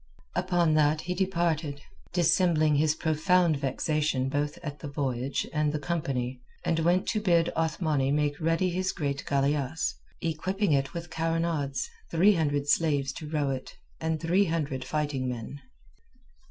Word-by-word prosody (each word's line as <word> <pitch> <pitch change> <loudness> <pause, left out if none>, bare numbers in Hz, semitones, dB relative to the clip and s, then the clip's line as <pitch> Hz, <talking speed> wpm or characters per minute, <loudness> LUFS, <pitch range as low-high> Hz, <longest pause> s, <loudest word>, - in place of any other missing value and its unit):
Upon 175 -2 +2
that 155 0 +3
he 180 - -3
departed, 170 -6 0 0.3
dissembling 170 -3 +3
his 155 +1 +3
profound 160 +1 +2
vexation 140 0 0
both 145 +1 -1
at 150 -2 -5
the 150 - -6
voyage 135 -2 -2
and 150 -1 +1
the 155 - -1
company, 135 -5 -2 0.2
and 165 - +1
went 175 +3 +2
to 215 - 0
bid 170 -4 +3
Othmani 155 -4 +1
make 145 +1 0
ready 165 +3 +1
his 185 +2 -1
great 140 -4 -2
galeasse, 140 +1 0 0.3
equipping 185 +4 -1
it 140 +1 0
with 170 0 -6
carronades, 165 -4 -1 0.2
three 185 +6 +5
hundred 145 -4 0
slaves 145 -3 +2
to 150 +1 -7
row 150 -3 0
it, 130 -1 -6 0.2
and 160 -1 -1
three 175 +5 +3
hundred 150 -6 -2
fighting 145 -4 -1
men. 125 +4 -6
155 Hz, 145 wpm, -28 LUFS, 140-170 Hz, 0.3 s, three